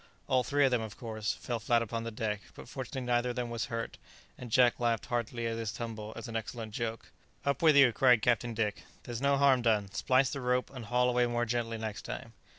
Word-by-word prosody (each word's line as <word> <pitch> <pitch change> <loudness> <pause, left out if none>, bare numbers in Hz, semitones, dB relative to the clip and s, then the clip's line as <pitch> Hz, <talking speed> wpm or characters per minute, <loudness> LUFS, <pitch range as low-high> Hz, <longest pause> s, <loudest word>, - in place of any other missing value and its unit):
All 130 -1 +2
three 145 +2 +3
of 135 - +2
them, 125 -2 +2
of 110 -2 -7
course, 110 -3 -3
fell 120 -2 -4
flat 115 +1 +2
upon 115 +1 -4
the - - -2
deck; 110 -2 -3
but - - -11
fortunately 130 +1 -5
neither 120 0 +1
of 120 - -3
them 120 -2 -3
was 115 0 -2
hurt, 115 0 -5 0.4
and 125 - -9
Jack 125 0 +4
laughed 115 -2 +1
heartily 120 0 -2
at 115 0 -1
his 110 -2 -2
tumble 110 -2 -6
as - - -7
an 115 - -7
excellent 110 0 -5
joke. 115 -1 -4 0.3
"Up 140 -2 0
with 155 -3 +6
you!" 135 -4 +7
cried 125 -4 +4
Captain 120 -1 +1
Dick; 105 -2 -1 0.2
"there's 120 0 -5
no 140 0 +3
harm 135 -2 +5
done; 105 -4 +1
splice 130 +4 +2
the 140 - -4
rope, 125 0 0
and 125 -4 -7
haul 125 +4 +2
away 125 0 +3
more 120 0 0
gently 115 -1 -1
next 110 -2 -4
time." - - -7
120 Hz, 235 wpm, -31 LUFS, 115-125 Hz, 0.4 s, you